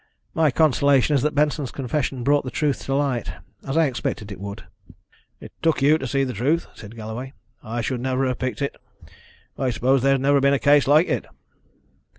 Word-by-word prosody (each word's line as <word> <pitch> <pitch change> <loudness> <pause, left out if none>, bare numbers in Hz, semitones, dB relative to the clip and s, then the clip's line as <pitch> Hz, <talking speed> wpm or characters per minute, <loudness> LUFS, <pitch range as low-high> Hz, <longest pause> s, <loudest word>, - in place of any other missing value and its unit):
"My 160 -3 +3
consolation 140 -1 +3
is 135 - +2
that 150 +2 -1
Benson's 150 -2 +1
confession 135 -1 -3
brought 145 +2 +3
the 130 - -5
truth 145 +1 -1
to 135 - -1
light, 135 -5 -1 0.3
as 135 +3 -1
I 165 - +5
expected 115 -5 -3
it 100 - -8
would." 100 +2 -7 0.8
"It - - -11
took 165 -1 +2
you 155 +3 +4
to 135 - -4
see 135 +2 0
the 130 -2 -3
truth," 140 +10 0
said 105 +2 -12
Galloway. 115 +4 -7 0.3
"I 115 +2 -4
should 120 +2 -3
never 130 +1 0
have 125 -1 -2
picked 130 0 -3
it. 140 - -3 0.8
I 130 - +1
suppose 125 +3 +1
there 135 +1 +3
has 135 - +1
never 140 +1 +3
been 140 +1 +4
a - - +2
case 145 -1 +4
like 155 +5 +5
it." - - -2
135 Hz, 200 wpm, -23 LUFS, 125-145 Hz, 0.8 s, I